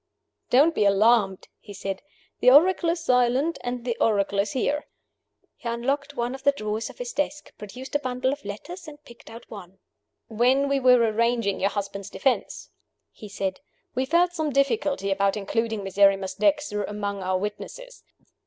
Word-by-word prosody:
"Don't 290 +7 +5
be 215 - +1
alarmed," 200 -1 +3
he 205 -2 -12
said. 195 0 -5 0.4
"The 250 - +6
oracle 335 +5 +5
is 335 0 -1
silent; 250 +4 +2
and 245 -1 -4
the 240 -2 -1
oracle 200 -2 +2
is 200 +1 0
here." 290 +3 -1 0.7
He 235 - -5
unlocked 275 +5 -2
one 240 0 -2
of 265 - -8
the 280 0 +3
drawers 215 -3 -3
of - - -13
his - - -5
desk; 295 -2 -3
produced 250 +6 -9
a 290 - +2
bundle 255 -1 -1
of 285 - -9
letters, 335 - -8
and 295 0 -12
picked 235 - -15
out 230 +1 -11
one. 190 -3 -10 0.5
"When 250 +5 +2
we 280 0 +1
were 250 -1 +6
arranging 230 -2 +1
your 195 - +2
husband's 200 -1 -5
defense," 265 +3 -2 0.4
he 210 - -11
said, 195 -1 -3 0.3
"we 260 +1 0
felt 345 +5 +2
some 315 -3 -1
difficulty 275 - 0
about 195 +1 +1
including 220 +1 -2
Miserrimus 195 0 +2
Dexter 295 -9 +1
among 205 -1 -4
our 185 0 0
witnesses. - - -7
240 Hz, 170 wpm, -25 LUFS, 205-280 Hz, 0.7 s, The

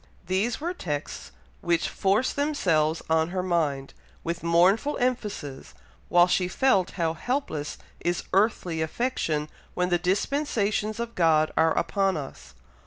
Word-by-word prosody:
These 195 +6 0
were 340 +4 -2
texts 150 - -5 0.3
which 170 -1 +1
forced 200 +6 +1
themselves 175 - +1
on 160 0 +2
her 185 0 -2
mind, 150 -7 -1 0.3
with 170 +1 -3
mournful 180 - +3
emphasis, 210 - -3 0.3
while 175 0 +6
she 180 0 +1
felt 195 -2 +2
how 165 -2 +1
helpless 165 - -3 0.2
is 175 0 -1
earthly 185 -5 +1
affection 160 -5 -1 0.3
when 180 0 0
the 175 -1 +2
dispensations 215 - 0
of 235 0 -4
God 160 -4 +3
are 160 0 +3
upon 195 -3 +1
us. 100 - -9
180 Hz, 130 wpm, -26 LUFS, 160-220 Hz, 0.3 s, while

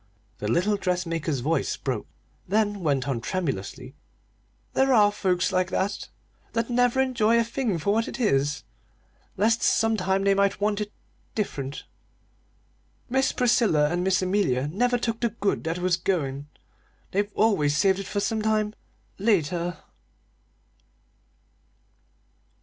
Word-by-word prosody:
The 105 - -3
little 185 - +2
dressmaker's 165 -7 -1
voice 155 +2 0
broke, - - -3 0.4
then 205 +1 +1
went 140 -6 0
on 130 -4 -1
tremulously: 130 - -4 0.8
"There 265 -1 +3
are 205 -2 +5
folks 185 -3 0
like 185 0 +1
that, 200 +2 -2
you - - -37
know - - -34
that 230 - -18
never 245 +1 +2
enjoy 235 -4 +3
a - - +3
thing 230 -4 -2
for 185 +6 0
what 225 +1 +1
it - - -6
is, 145 - +1 0.7
lest 225 +4 +2
sometime 195 -4 +2
they 200 0 +4
might 200 0 +1
want 205 0 0
it 210 0 -4 0.4
different. 140 -10 -3 1.3
Miss 265 +1 +2
Priscilla 220 - +3
and 175 +1 0
Miss 190 0 +2
Amelia 180 -9 +1
never 245 +8 +1
took 230 -1 -2
the 235 - +1
good 205 -2 -1
that 165 +1 -1
was 180 -1 +1
goin'; 145 -7 -2 0.6
they've 205 +2 0
always 150 -10 +2
saved 190 +3 +3
it 195 - -6
for 205 - -2
sometime 215 0 0 0.5
later." 175 -4 +1
195 Hz, 135 wpm, -25 LUFS, 165-220 Hz, 1.3 s, are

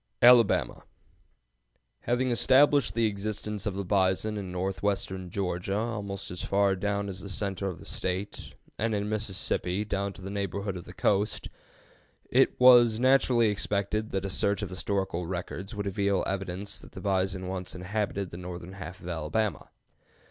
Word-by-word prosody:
ALABAMA. 120 -3 +6 1.2
Having 125 +1 +1
established 130 -2 +4
the 115 -1 +3
existence 105 0 -3
of 100 - -2
the 100 0 -3
bison 95 +2 +1
in 100 -3 -5
northwestern 95 0 -2
Georgia 95 +1 -2
almost 105 -4 -4
as 90 - -5
far 100 -1 +2
down 100 +1 -1
as 95 -1 -6
the 100 - -8
center 100 -1 -2
of 90 - -4
the - - -13
State, 95 +2 -4 0.2
and 110 +1 +1
in 105 0 -1
Mississippi 105 -2 -1
down 100 -1 -2
to - - -13
the 95 - -5
neighborhood 100 0 -3
of 90 - -7
the - - -10
coast, 105 +1 0 0.8
it - - +3
was 120 -3 +7
naturally 125 -3 +4
expected 105 +1 -1
that 95 0 -2
a - - -2
search 100 +2 +1
of 100 - -4
historical 90 -2 -2
records 95 +3 -5
would 100 0 -3
reveal 100 0 +1
evidence 95 +1 -3
that - - -15
the - - -8
bison 95 -1 0
once 90 -1 -4
inhabited 100 +1 -2
the 85 - -7
northern 90 0 -7
half 90 -1 -8
of - - -9
Alabama. 90 +6 -2
100 Hz, 160 wpm, -28 LUFS, 95-105 Hz, 1.2 s, was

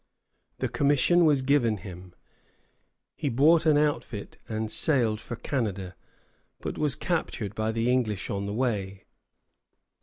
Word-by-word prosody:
The - - -1
commission 145 +5 +3
was 145 -4 +3
given 130 -6 +2
him. 90 -2 -11 1.0
He 150 - -2
bought 155 +7 +4
an 150 -2 +5
outfit 145 -8 -2
and 110 -1 -3
sailed 115 -8 +3
for 120 - -6
Canada, 100 -9 -3 0.7
but - - -5
was 150 -3 +1
captured 125 - -3
by 110 +1 -1
the 115 +1 -1
English 120 -6 0
on 100 0 -3
the 100 - -3
way. 100 -6 -2
115 Hz, 130 wpm, -27 LUFS, 105-145 Hz, 1.0 s, an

